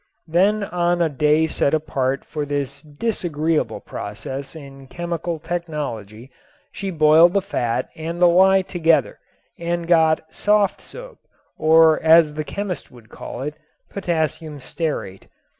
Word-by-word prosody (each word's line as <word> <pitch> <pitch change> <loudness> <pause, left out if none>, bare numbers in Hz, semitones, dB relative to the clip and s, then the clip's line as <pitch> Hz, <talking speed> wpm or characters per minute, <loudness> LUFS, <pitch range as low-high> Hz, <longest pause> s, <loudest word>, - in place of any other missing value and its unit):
Then 195 +6 +2
on 175 -2 0
a 170 -2 +2
day 150 +2 +2
set 160 -1 +1
apart 140 -3 -2
for 150 -2 -4
this 140 -1 -4
disagreeable 160 -1 -2
process 135 +2 -7
in 135 -3 -12
chemical 170 +2 -4
technology 140 - -5 0.4
she 195 - -5
boiled 160 +1 +5
the 200 - +3
fat 125 - -2
and 165 +2 -5
the 180 - +5
lye 190 +2 +5
together 165 -6 +1 0.4
and 170 0 -3
got 160 -2 +3
"soft 205 -1 +1
soap," - - -12 0.4
or 160 0 +5
as 160 -1 +5
the 155 0 -3
chemist 180 +6 -5
would 120 -3 -17
call 125 - -8
it, 150 +1 -4 0.4
potassium 160 -5 -3
stearate. 130 - -5
160 Hz, 130 wpm, -21 LUFS, 145-175 Hz, 0.4 s, boiled